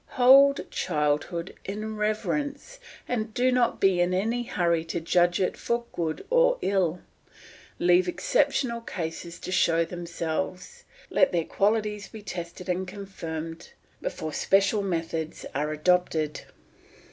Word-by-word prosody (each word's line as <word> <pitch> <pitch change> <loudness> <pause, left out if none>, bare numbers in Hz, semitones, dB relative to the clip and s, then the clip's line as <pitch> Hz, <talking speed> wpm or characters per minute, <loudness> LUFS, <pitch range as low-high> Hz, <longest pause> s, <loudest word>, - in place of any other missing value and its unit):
Hold 275 +3 +7
childhood 155 +2 -1
in 215 +2 -5
reverence, 280 - -2 0.3
and 220 -3 -2
do 255 +1 +3
not 245 -2 +2
be 190 -2 +3
in 180 +1 +2
any 225 +6 0
hurry 170 -7 0
to 170 - -3
judge 175 +1 +2
it 185 - 0
for 235 0 -2
good 160 -2 -3
or - - +4
ill. 180 -3 +1 0.8
Leave 180 +1 +4
exceptional 245 +4 +1
cases 170 -4 -6
to - - -5
show 165 -2 +3
themselves, 175 - -4 0.3
let 280 - +4
their 170 -2 0
qualities 210 0 0
be 220 -2 -11
tested 175 -1 -7
and 185 +1 -1
confirmed, 165 -5 -7 0.3
before 155 -1 -4
special 200 +5 +2
methods 165 -4 -3
are 150 +2 -1
adopted. 155 -1 +1
185 Hz, 125 wpm, -27 LUFS, 170-225 Hz, 0.8 s, Hold